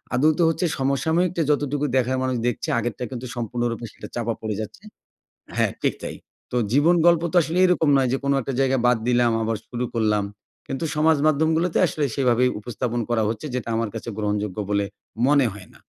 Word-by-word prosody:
আদৌতে 155 +5 +3
হচ্ছে 165 +2 0
সমসাময়িকটা 160 +6 +1
যতটুকু 145 0 0
দেখার 130 +1 +1
মানুষ 130 -1 0
দেখছে, 120 - -2
আগেরটা 120 +1 -3
কিন্তু 125 0 -5
সম্পূর্ণরূপে 120 0 -2
সেটা - - -10
চাপা 115 -1 -1
পড়ে 110 -2 -3
যাচ্ছে 110 - -9 0.7
হ্যাঁ, - - +2
ঠিক - - +1
তাই। - - -5 0.4
তো - - -1 0.2
জীবন 150 +6 +5
গল্প 170 -1 +5
তো - - 0
আসলে 165 +4 -2
এরকম 175 -4 +2
নয় 130 -2 +3
যে 135 - +1
কোন 140 - +2
একটা 135 - -4
জায়গায় 135 -2 +2
বাদ 125 -2 +4
দিলাম 120 -1 +3
আবার 110 0 0
শুরু 125 0 -3
করলাম। 105 -2 +2 0.4
কিন্তু 135 +4 -3
সমাজ 155 +1 +4
মাধ্যমগুলোতে 160 +3 +2
আসলে 155 -2 -2
সেভাবেই 125 -2 +3
উপস্থাপন 120 +1 -3
করা 115 -2 +2
হচ্ছে, 110 +6 -4
যেটা 125 -2 -3
আমার 115 -2 -1
কাছে - - -6
গ্রহণযোগ্য 105 -2 -2
বলে 100 0 +2 0.4
মনে 140 -3 +4
হয় 100 -3 -12
না। - - -18
125 Hz, 185 wpm, -23 LUFS, 115-150 Hz, 0.7 s, জীবন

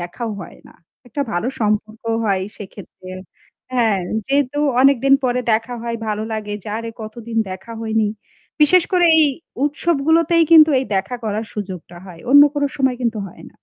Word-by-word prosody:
দেখাও 180 +7 -5
হয় 175 - -11
না। - - -18 0.3
একটা 285 +4 -2
ভালো 175 +8 -1
সম্পর্কও 220 +1 -1
হয় 195 -3 0
সেক্ষেত্রে 195 -2 -12 0.6
হ্যাঁ, 225 -6 +2 0.3
যেহেতু 280 0 0 0.2
অনেকদিন 275 0 +4
পরে 250 0 +1
দেখা 225 +3 -1
হয় 235 0 -3
ভালো 210 0 -2
লাগে 210 -1 -4
যে, - - -8
"আরে 230 0 -6
কতদিন 225 +1 -8
দেখা 190 +5 -8
হয়নি!" 220 -1 0 0.5
বিশেষ 345 +4 +6
করে 355 -1 +4
এই - - +7 0.4
উৎসবগুলোতেই 325 +2 +2
কিন্তু 315 -1 +8
এই 260 - -1
দেখা 195 +6 -2
করার 215 +1 -2
সুযোগটা 185 -4 -7
হয়। 175 -3 -12
অন্য 285 +1 +9
কোনো 290 -1 +1
সময় 265 -2 +1
কিন্তু 230 -2 -1
হয় - - -15
না। - - -11
230 Hz, 165 wpm, -19 LUFS, 210-275 Hz, 0.6 s, অন্য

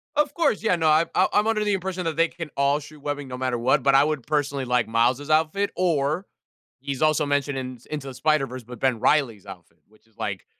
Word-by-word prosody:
Of 295 -1 +1
course, 330 -12 +1
yeah, 220 -5 +2
no, 160 -2 0
I 155 +2 +4
I 185 - +4
I'm 210 +1 +3
under 220 -1 +1
the 210 -1 +1
impression 185 -1 -3
that 165 - -1
they 165 +1 +3
can 165 -2 -8
all 140 +1 +2
shoot 150 0 -13
webbing 145 -1 -4
no 125 -1 -6
matter 130 -1 -1
what, 130 +4 +2
but 135 +1 +3
I 135 - +6
would 150 -4 -2
personally 145 -2 -1
like 125 -2 +1
Miles' 120 +5 +1
outfit, 160 +6 +1
or, 165 0 0 0.5
he's 140 -2 -4
also 155 0 +3
mentioned 145 -1 0
in 130 -1 -5
s 120 - -22
into 145 -3 -5
the 135 - -6
Spider-Verse, 135 -3 0
but 120 0 -11
Ben 130 -4 +1
Reilly's 115 -10 +1
outfit, 90 -4 -12
which 110 +1 -27
is, 110 - -32
like, 95 -3 -4
145 Hz, 240 wpm, -24 LUFS, 125-160 Hz, 0.5 s, I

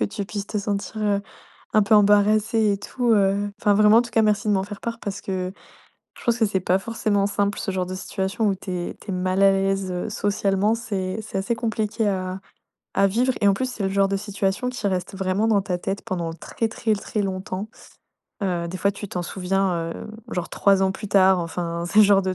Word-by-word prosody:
que - - +3
tu 205 0 -4
puisses 205 0 -5
te 210 - -2
sentir, 200 +1 -3
heu, 205 -1 +2 0.5
un 215 - +5
peu 205 +2 +3
embarrassé 210 +1 +4
et 200 - -2
tout. 240 +3 0
Heu, 200 0 +2
enfin 205 - +3
vraiment, 210 +2 +6
en - - +4
tout 235 - -9
cas, 225 0 +3
merci 210 0 +1
de - - +4
m'en 190 -1 +2
faire 205 0 -8
part, 230 -1 -4
parce 200 -1 -4
que 185 -1 -3 0.7
je - - -12
pense 235 0 +2
que 225 - +3
c'est 195 -2 0
pas 185 +1 +2
forcément 205 -1 0
simple 200 0 0
ce 200 - -2
genre 185 -1 -1
de 185 - -5
situation. 190 +4 -2
Où 195 - +2
tu 190 0 -8
es 175 -1 -3
tu 205 - -7
es - - -2
mal 185 +1 0
à 195 - +7
l'aise, 195 0 0
heu, 180 +3 -3
socialement, 205 0 +1
c'est 200 -3 -3
c'est 205 -2 -4
assez 195 +5 0
compliqué 220 -1 -1
à 185 -1 -2 0.5
à 195 0 +4
vivre 245 +6 +2
et 205 - +3
en 200 - +5
plus, 255 +6 -2
c'est 225 - -5
le 190 - +1
genre 195 0 +2
de 195 - 0
situation 200 +3 -1
qui 250 -4 -5
reste 185 -1 -1
vraiment 190 +3 0
dans 210 -3 +3
ta 185 -2 -2
tête 195 +2 -3
pendant 175 -6 -3
très, 225 +6 -3
très, 220 0 0
très, 210 +1 -2
longtemps. 190 +1 -4 0.7
Heu, 175 -3 -1
des 185 - -5
fois, 200 +2 +2
tu 205 +1 -8
t'en 180 - -3
souviens, 180 -2 -1
hem, - - -8 0.2
genre 180 -4 -3
3 195 -1 +3
ans 190 0 +2
plus 210 +1 -7
tard. 190 -1 +5
Enfin 170 0 -3
c'est 205 +5 +4
le - - +9
genre 200 -1 +5
de 185 0 -1
200 Hz, 235 wpm, -23 LUFS, 190-215 Hz, 0.7 s, le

